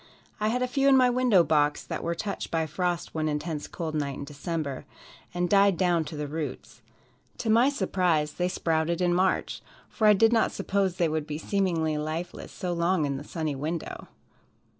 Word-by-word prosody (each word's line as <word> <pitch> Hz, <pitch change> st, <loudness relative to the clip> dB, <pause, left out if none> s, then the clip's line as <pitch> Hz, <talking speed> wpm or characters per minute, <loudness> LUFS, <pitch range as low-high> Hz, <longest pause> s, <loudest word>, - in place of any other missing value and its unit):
I 215 Hz, -, +1 dB
had 250 Hz, +3 st, 0 dB
a -, -, 0 dB
few 275 Hz, +2 st, +2 dB
in 270 Hz, -, +6 dB
my 250 Hz, -1 st, +5 dB
window 245 Hz, -8 st, +4 dB
box 150 Hz, -2 st, +2 dB
that -, -, -5 dB
were 170 Hz, 0 st, -1 dB
touched 200 Hz, +4 st, -4 dB
by 160 Hz, -1 st, 0 dB
frost 175 Hz, +2 st, -2 dB
one 155 Hz, -1 st, -1 dB
intense 150 Hz, 0 st, -3 dB
cold 160 Hz, -2 st, -5 dB
night 140 Hz, -3 st, -2 dB
in -, -, -6 dB
December, 145 Hz, -1 st, -4 dB, 0.5 s
and 175 Hz, 0 st, -1 dB
died 200 Hz, -1 st, +4 dB
down 175 Hz, -3 st, +2 dB
to 150 Hz, 0 st, -7 dB
the 150 Hz, -, -3 dB
roots. 145 Hz, -5 st, -6 dB, 0.6 s
To 225 Hz, -, -1 dB
my 235 Hz, +5 st, +5 dB
surprise, 175 Hz, -, 0 dB
they 180 Hz, -, -1 dB
sprouted 165 Hz, -1 st, 0 dB
in 175 Hz, -1 st, +2 dB
March, 185 Hz, +1 st, 0 dB, 0.3 s
for 220 Hz, -, +1 dB
I 210 Hz, -, +8 dB
did 225 Hz, +3 st, +4 dB
not 225 Hz, -, +3 dB
suppose 195 Hz, -2 st, -1 dB
they 175 Hz, -2 st, +2 dB
would 155 Hz, -1 st, -2 dB
be 150 Hz, -1 st, -4 dB
seemingly 165 Hz, -4 st, 0 dB
lifeless 155 Hz, +3 st, -5 dB
so 180 Hz, -1 st, -3 dB
long 170 Hz, -1 st, +1 dB
in 140 Hz, -1 st, -2 dB
a -, -, -8 dB
sunny 155 Hz, -1 st, -3 dB
window. 155 Hz, +4 st, -5 dB
170 Hz, 195 wpm, -27 LUFS, 155-195 Hz, 0.6 s, I